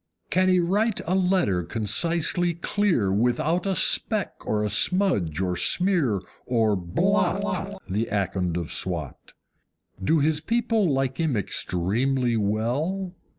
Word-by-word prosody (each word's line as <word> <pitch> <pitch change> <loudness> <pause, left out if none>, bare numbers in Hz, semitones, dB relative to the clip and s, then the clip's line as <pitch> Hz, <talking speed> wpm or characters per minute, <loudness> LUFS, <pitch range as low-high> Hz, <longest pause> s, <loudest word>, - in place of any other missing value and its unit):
Can 185 0 +3
he 185 -1 +4
write 205 +5 +1
a 180 - -1
letter 180 - +1
concisely 165 - 0
clear 170 - 0
Without 150 - 0
a 190 - 0
speck 210 0 +1 0.2
or 105 0 0
a - - 0
smudge 110 - +1
or 90 -1 -1
smear 145 - +2 0.3
or 115 -4 +2
BLOT, 190 - -1
The 105 +4 -1
Akond 95 -4 -1
of 85 -3 -4
Swat? 85 -8 -4 0.7
Do 160 +12 +3
his 150 +1 +1
people 225 -4 +1
like 135 -1 -1
him 155 -8 0
extremely 115 +7 0
well? 125 - -1
140 Hz, 125 wpm, -25 LUFS, -, 0.7 s, he